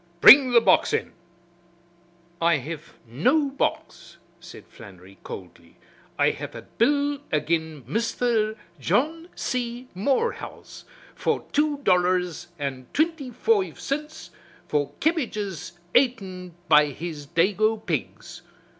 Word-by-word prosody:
Bring 265 +6 +9
the 235 -1 +6
box - - +3
in." - - -1 1.3
"I 170 -1 +4
hev 155 +4 -8
no 270 - +1
box," 275 - -3 0.2
said - - -12
Flannery 95 0 -15
coldly. 85 -3 -10 0.4
"I - - +3
hev - - -8
a - - -8
bill 285 +3 +1
agin 160 -2 -1
Misther 225 - 0 0.2
John 305 - 0
C. 245 0 -3
Morehouse 270 - -2 0.3
for - - -1
two 295 -1 +1
dollars 180 - +1
and 135 -3 -5
twinty 315 -4 0
foive 385 - 0
cints 300 +2 -5 0.4
for 145 -2 0
kebbages 215 - -2 0.2
aten 190 -9 0
by 150 -1 +6
his 150 0 -7
dago 210 +7 +2
pigs. - - -4
205 Hz, 110 wpm, -25 LUFS, -, 1.3 s, Bring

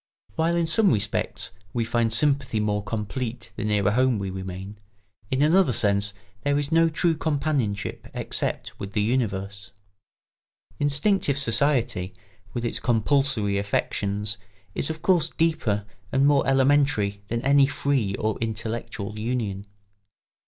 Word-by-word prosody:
While 165 +1 +1
in 170 -1 +2
some 190 +4 +3
respects 105 -3 -1 0.2
we 115 -2 0
find 115 -1 +1
sympathy 130 -1 +1
more 105 -1 0
complete 115 +3 -4
the 120 - -4
nearer 105 -1 +2
home 130 +1 +3
we 100 -1 -3
remain, 95 +2 -7 0.5
in 135 +2 +1
another 165 -2 +4
sense 100 -1 +1 0.3
there 145 +2 +1
is 145 +1 -1
no 165 0 +5
true 165 +1 +1
companionship 140 -10 -1
except - - -3
with 100 0 -6
the 105 - +1
universe. 100 -4 -2 1.1
Instinctive 145 +1 +1
society, 115 -7 +1 0.4
with 120 0 -3
its 120 - 0
compulsory 115 -3 +1
affections, 100 0 -2 0.3
is 140 - -2
of 160 0 -5
course 170 -4 +3
deeper 140 -11 0 0.3
and 135 +1 +3
more 145 -1 +4
elementary 135 -7 +2
than 115 +2 -2
any 140 0 +5
free 135 -9 0
or 110 -1 -2
intellectual 110 -2 -4
union. 105 -4 -2
115 Hz, 130 wpm, -25 LUFS, 105-140 Hz, 1.1 s, no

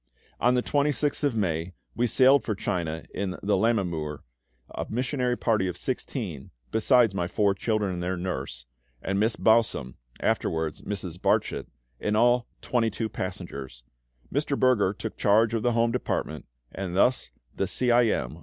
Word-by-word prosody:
On 125 +1 +3
the 125 - +1
26th 145 0 0
of 140 -5 +1
May 85 -4 -1 0.2
we 120 +1 +2
sailed 130 +4 +5
for 110 - -2
China 85 -6 -2
in 95 -1 -2
the 100 +1 +2
Lammermuir, 90 -9 0 0.5
a - - -4
missionary 125 +1 -1
party 110 -5 +1
of 90 - -4
16 - - -4 0.2
(besides 115 -1 +4
my 90 -3 -1
four 100 +2 +2
children 105 -1 -1
and 90 - -4
their 90 +1 -2
nurse, 70 -9 -4 0.4
and 95 +1 0
Miss 110 +2 +2
Bausum 110 - +2 0.3
(afterwards 80 -1 -1
Mrs. 90 -4 -5
Barchet)); - - +1 0.3
in 105 - 0
all 120 +2 +3 0.2
22 115 -2 0
passengers. 70 - -6 0.5
Mr. 145 0 0
Berger 120 -7 +4
took 110 +1 -6
charge 110 +2 +3
of 115 - 0
the 120 +1 +1
home 115 0 +2
department, 125 - -3 0.2
and 95 -2 -5
thus 125 +6 +2 0.3
the - - -1
C. 125 -1 +1
I. 120 0 +5
M. 75 - -2
105 Hz, 155 wpm, -27 LUFS, 90-120 Hz, 0.5 s, sailed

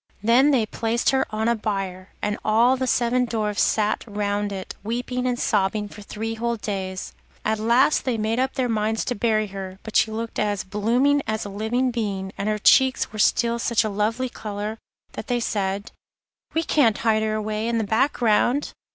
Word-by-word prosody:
Then 245 +6 +5
they 255 -6 +3
placed 225 +2 0
her 265 0 +1
on 220 +1 -1
a 235 - +4
bier, 195 -4 -4
and 210 0 -1
all 230 +4 +4
the 260 0 -2
seven 250 +1 +2
Dwarfs 215 -3 -1
sat 215 -1 +1
round 205 -1 -1
it, 190 -1 -6
weeping 250 +3 -2
and 245 -1 0
sobbing 210 0 +1
for 210 - -12
three 220 +2 -4
whole 235 +1 -1
days. 190 -3 -4 0.3
At 220 0 +1
last 235 +7 +3
they 250 -3 -1
made 220 +2 0
up 260 +1 0
their 255 -2 0
minds 220 -1 0
to - - -1
bury 215 -1 +1
her, 190 -1 -6
but 220 - -9
she - - +4
looked 225 +1 -4
as 205 -2 0
blooming 240 +9 +2
as 220 -1 -2
a - - -5
living 225 +6 0
being, 200 -5 -3
and 200 - -2
her 215 - 0
cheeks 260 +3 +4
were 215 - -6
still 235 +2 +2
such 235 -2 +2
a 215 - -1
lovely 220 +5 -1
colour, 215 -1 -5 0.3
that - - -7
they 245 -2 0
said: 200 -2 -2 0.6
'We 325 - +2
can't 250 -10 +3
hide 220 -1 +2
her 215 0 0
away 215 +1 -2
in 235 0 0
the 225 - +1
black 225 +7 +2
ground. 240 +5 +2
220 Hz, 195 wpm, -23 LUFS, 210-240 Hz, 0.6 s, Then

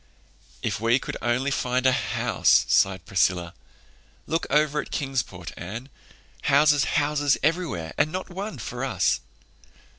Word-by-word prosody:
"If - - -1
we 115 +2 +4
could - - -5
only 125 +4 0
find 125 -1 0
a 130 - +6
house!" - - +2
sighed 95 -1 +2
Priscilla. 90 -3 +1 0.7
"Look 165 +1 -1
over 150 0 +2
there - - +2
at - - -12
Kingsport, 120 - -3
Anne—houses, 135 - 0
houses 145 -1 +2
everywhere, 150 - -1
and 155 - +3
not 185 +2 -4
one 195 -2 -5
for 125 +2 -5
us." 100 -10 +1
135 Hz, 130 wpm, -25 LUFS, 105-150 Hz, 0.7 s, a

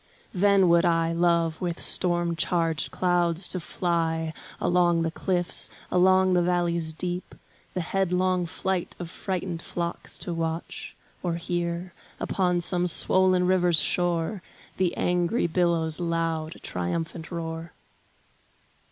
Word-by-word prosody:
Then 195 0 +4
would 170 0 +5
I 165 -1 +2
love 170 -1 +2
with 175 -2 -2
storm 175 -1 +1
charged 165 -2 0
clouds 175 -1 +1
to 185 - -1
fly 165 -2 -1 0.3
Along 175 -1 +3
the 165 - -1
cliffs, 175 +1 0 0.2
along 185 +1 +4
the 180 - +4
valleys 170 -2 0
deep, 175 +2 -4 0.4
The 180 - 0
headlong 185 0 +1
flight 185 +1 -2
of 175 -2 -7
frightened 185 -3 -3
flocks 170 0 -4
to 175 - -1
watch, 165 0 -4 0.3
Or 175 -2 -1
hear, 170 +1 -3 0.3
upon 180 -2 +1
some 180 +1 +1
swollen 185 +1 +3
river's 180 -3 +3
shore 175 +4 0 0.4
The 185 -2 0
angry 180 +5 +1
billows' 170 -2 +1
loud, 165 -2 -1
triumphant 160 - -3
roar. 165 -1 -5
175 Hz, 120 wpm, -26 LUFS, 165-180 Hz, 0.4 s, would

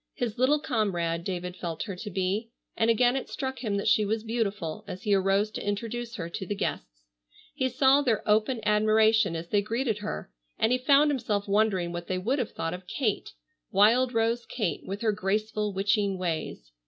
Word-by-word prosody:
His 240 -1 -3
little 265 +4 +4
comrade, 190 - -1
David 180 -1 -4
felt 170 -3 -4
her 200 -4 -5
to 210 +3 -6
be, 195 +4 -1 0.3
and 225 - +2
again 245 +2 +4
it 270 - -3
struck 265 -2 -4
him 210 -5 -1
that 200 - -2
she 215 - +4
was 215 +1 -1
beautiful 210 -5 -2
as 185 +1 -7
he 210 -3 +2
arose 195 +2 +2
to - - -5
introduce 230 +3 -3
her 170 -5 -4
to 170 - -5
the 205 - -2
guests. - - -4 0.5
He 260 -3 0
saw 265 +3 +4
their 235 -7 0
open 215 +3 +2
admiration 215 -2 +3
as 165 +1 -6
they 205 - +3
greeted 225 +1 -1
her, 75 - -5 0.3
and 220 - +2
he 250 - +2
found 285 +3 +5
himself 215 -7 -1
wondering 200 -4 +1
what 175 0 -6
they 185 - -1
would 240 +10 0
have 245 - -1
thought 165 - -3
of 180 0 -8
Kate, 220 -3 -2 0.4
wild 230 +6 +4
rose 230 0 0
Kate 195 - -2
with 200 +2 -5
her 225 -2 +2
graceful 210 +1 -1
witching 200 0 +1
ways. 160 - -4
210 Hz, 195 wpm, -27 LUFS, 190-230 Hz, 0.5 s, found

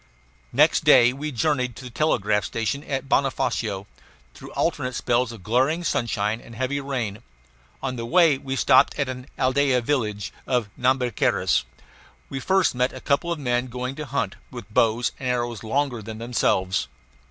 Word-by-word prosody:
Next - - +4
day 120 +1 +6
we 150 +3 -4
journeyed 125 -2 0
to - - -10
the 125 - -8
telegraph 110 -8 +1
station 115 +8 -2
at 135 -1 -3
Bonofacio, 120 -7 0 0.5
through - - -11
alternate 125 -1 -1
spells 120 0 +1
of 110 -5 -11
glaring 130 - +1
sunshine 110 -6 -1
and 115 - -13
heavy 130 +4 -1
rain. 120 -7 -3 0.6
On 130 -2 -2
the 115 - -4
way 165 -3 +4
we 135 0 -4
stopped - - +4
at 140 -2 0
an 125 0 -6
aldea 130 0 +2
village 110 -7 -1
of 125 -5 0
Nhambiquaras. 125 -2 +1 0.6
We 135 - -4
first 190 +5 +2
met 125 +1 0
a 130 - -7
couple 145 +6 0
of 170 - -1
men 125 -3 0
going 125 +1 -4
to 150 +1 -7
hunt, 140 +1 -2
with 120 -5 -10
bows 115 +2 +2
and 130 - -2
arrows 120 -2 -2
longer 125 +1 -1
than 110 +1 -7
themselves. 110 -5 0
125 Hz, 165 wpm, -24 LUFS, 115-135 Hz, 0.6 s, day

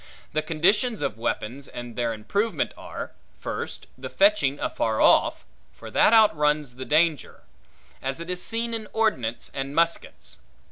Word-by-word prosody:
The 155 - +1
conditions 185 - +1
of 110 -6 -2
weapons, 120 +4 -3
and 120 -1 -8
their 120 -1 0
improvement, 200 - -1
are; - - -7 0.3
First, - - -5
the - - -7
fetching 300 - +3
afar 110 -1 -1
off; - - +4 0.3
for - - -11
that - - +5
outruns 150 - +3
the 130 - -5
danger; 155 +1 +1 0.6
as 135 +3 -3
it 170 - -7
is 180 0 -3
seen 230 +1 -2
in 220 -2 -4
ordnance 130 - 0
and 135 +1 -4
muskets. 170 0 -1
155 Hz, 145 wpm, -25 LUFS, 130-210 Hz, 0.6 s, that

